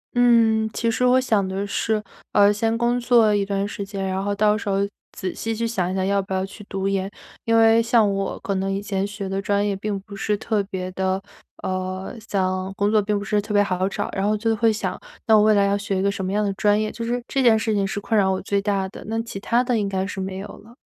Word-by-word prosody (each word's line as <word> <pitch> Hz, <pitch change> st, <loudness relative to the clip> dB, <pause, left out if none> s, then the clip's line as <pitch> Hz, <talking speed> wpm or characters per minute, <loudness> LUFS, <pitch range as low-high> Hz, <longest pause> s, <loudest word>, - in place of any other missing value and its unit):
嗯， 230 Hz, -2 st, +4 dB
其 230 Hz, -1 st, 0 dB
实 225 Hz, +2 st, -1 dB
我 250 Hz, +1 st, +5 dB
想 220 Hz, -7 st, +1 dB
的 190 Hz, +1 st, -3 dB
是， 215 Hz, +1 st, -1 dB, 0.3 s
呃， 205 Hz, 0 st, +6 dB
先 225 Hz, +2 st, 0 dB
工 240 Hz, +1 st, +1 dB
作 235 Hz, -3 st, +4 dB
一 205 Hz, -1 st, +2 dB
段 195 Hz, 0 st, -1 dB
时 205 Hz, 0 st, -5 dB
间， 195 Hz, -1 st, -4 dB
然 190 Hz, +1 st, -2 dB
后 205 Hz, 0 st, -1 dB
到 210 Hz, +1 st, +3 dB
时 215 Hz, -1 st, -4 dB
候 195 Hz, -, +1 dB, 0.3 s
仔 185 Hz, -2 st, -4 dB
细 225 Hz, 0 st, -3 dB
去 230 Hz, +1 st, -2 dB
想 185 Hz, -6 st, -1 dB
一 -, -, -3 dB
想 190 Hz, -1 st, 0 dB
要 200 Hz, +1 st, +2 dB
不 190 Hz, 0 st, -6 dB
要 190 Hz, 0 st, 0 dB
去 200 Hz, +2 st, -11 dB
读 195 Hz, 0 st, -2 dB
研。 195 Hz, -1 st, -1 dB, 0.4 s
因 230 Hz, 0 st, +3 dB
为 225 Hz, 0 st, +6 dB
像 230 Hz, -3 st, +3 dB
我 195 Hz, 0 st, -3 dB
可 200 Hz, -, -2 dB
能 190 Hz, +1 st, -1 dB
以 195 Hz, -, -1 dB
前 200 Hz, -1 st, -2 dB
学 205 Hz, -1 st, -6 dB
的 195 Hz, +1 st, -2 dB
专 205 Hz, +1 st, +1 dB
业 200 Hz, -, 0 dB
并 200 Hz, +1 st, -3 dB
不 200 Hz, +1 st, -11 dB
是 210 Hz, +1 st, -1 dB
特 215 Hz, 0 st, 0 dB
别 185 Hz, -2 st, -5 dB
地 190 Hz, 0 st, -1 dB, 0.4 s
呃， 185 Hz, +3 st, -3 dB
想 185 Hz, -1 st, -1 dB
工 205 Hz, +1 st, +1 dB
作 215 Hz, -1 st, +4 dB
并 205 Hz, 0 st, 0 dB
不 200 Hz, -, -5 dB
是 210 Hz, +1 st, +1 dB
特 210 Hz, 0 st, -4 dB
别 205 Hz, -, +5 dB
好 185 Hz, -1 st, -1 dB
找， -, -, -3 dB
然 195 Hz, -, -1 dB
后 210 Hz, +1 st, +2 dB
就 225 Hz, +1 st, 0 dB
会 225 Hz, +1 st, +3 dB
想， 215 Hz, -, -3 dB, 0.3 s
那 220 Hz, -, +5 dB
我 210 Hz, -, +6 dB
未 215 Hz, 0 st, +5 dB
来 200 Hz, -1 st, +4 dB
要 200 Hz, 0 st, +2 dB
学 200 Hz, -1 st, -2 dB
一 -, -, 0 dB
个 200 Hz, -, +2 dB
什 195 Hz, -, -5 dB
么 185 Hz, -, -2 dB
样 210 Hz, +1 st, +1 dB
的 200 Hz, -, -1 dB
专 205 Hz, +1 st, +2 dB
业， 215 Hz, 0 st, -1 dB
就 230 Hz, -, -6 dB
是 240 Hz, +1 st, -1 dB
这 270 Hz, -, 0 dB
件 235 Hz, -3 st, +5 dB
事 220 Hz, 0 st, -1 dB
情 200 Hz, -1 st, +1 dB
是 205 Hz, +1 st, -3 dB
困 210 Hz, +2 st, -2 dB
扰 190 Hz, -1 st, +3 dB
我 190 Hz, -, -1 dB
最 200 Hz, 0 st, 0 dB
大 200 Hz, -2 st, 0 dB
的， -, -, -11 dB
那 225 Hz, +1 st, -1 dB
其 230 Hz, -4 st, -7 dB
他 235 Hz, +4 st, +1 dB
的 245 Hz, -3 st, 0 dB
应 200 Hz, -1 st, -1 dB
该 190 Hz, -1 st, -1 dB
是 195 Hz, 0 st, -5 dB
没 190 Hz, 0 st, -4 dB
有 195 Hz, +2 st, -6 dB
了。 230 Hz, +3 st, -17 dB
205 Hz, 295 characters per minute, -23 LUFS, 195-220 Hz, 0.4 s, 呃